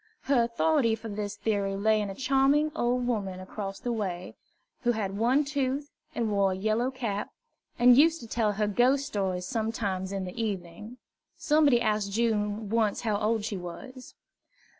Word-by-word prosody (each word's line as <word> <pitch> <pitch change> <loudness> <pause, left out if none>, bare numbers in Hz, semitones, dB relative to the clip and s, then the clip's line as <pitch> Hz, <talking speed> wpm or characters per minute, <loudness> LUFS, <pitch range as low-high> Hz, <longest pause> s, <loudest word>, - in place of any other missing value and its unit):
Her 270 -3 +2
authority 235 +1 +2
for 225 0 -8
this 205 0 -4
theory 200 -3 -1
lay 215 +2 +2
in 205 - -3
a 195 - -6
charmig 275 +4 +2
old 245 -2 0
woman 200 -6 -2
across 195 +1 -6
the 245 - -3
way, 185 -5 -3 0.5
who 240 -1 +2
had 200 -3 -3
one 250 +7 +2
tooth, 280 0 -2 0.2
and 225 -2 -1
wore 200 -2 +2
a - - -5
yellow 220 +5 0
cap, 230 -6 -3 0.5
and 245 0 +7
used 320 +4 +5
to 230 - -9
tell 220 -2 0
her 210 +1 0
ghost 250 +7 +2
stories 190 -7 -2
sometimes 215 -5 -2
in 195 -1 -3
the 185 +6 -5
evening. 205 +3 -5 0.4
Somebody 295 -5 +4
asked 210 -3 0
June 215 -1 0
once 220 -3 +1
how 215 -3 0
old 215 0 0
she 210 -3 -3
was. 255 +9 -9
220 Hz, 170 wpm, -28 LUFS, 200-250 Hz, 0.5 s, and